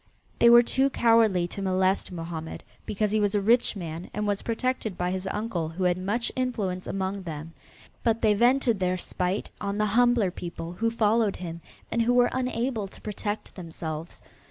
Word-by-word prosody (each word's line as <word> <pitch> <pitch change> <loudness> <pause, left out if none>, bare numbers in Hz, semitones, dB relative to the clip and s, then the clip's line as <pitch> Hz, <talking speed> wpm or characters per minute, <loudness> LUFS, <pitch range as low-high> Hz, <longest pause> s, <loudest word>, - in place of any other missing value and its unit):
They 235 - +7
were 240 0 +8
too 265 +3 +2
cowardly 225 -8 +3
to 200 - -6
molest 190 0 +1
Mohammed, 165 -2 -6 0.2
because 210 0 0
he 215 - +2
was 205 0 +1
a - - +4
rich 230 +4 +3
man 170 -2 -6
and 210 0 -1
was 205 -1 0
protected 230 -4 -2
by 180 0 -1
his 190 0 -3
uncle 200 -7 -2
who 175 +3 -4
had 180 0 +2
much 210 +6 -1
influence 210 -8 -2
among 195 +1 -2
them, 165 -2 -7 0.5
but 230 -1 0
they 215 -1 +5
vented 240 0 +3
their 185 0 +1
spite 180 +2 -2
on 200 0 -2
the 210 - +2
humbler 240 -5 +4
people 170 -1 -6
who 230 +5 0
followed 220 -2 +2
him 170 -2 -7 0.3
and 235 - +1
who 240 +2 +2
were 245 0 +4
unable 250 -4 -1
to - - -13
protect 210 0 -5
themselves. 165 -2 -7
200 Hz, 180 wpm, -27 LUFS, 180-230 Hz, 0.5 s, were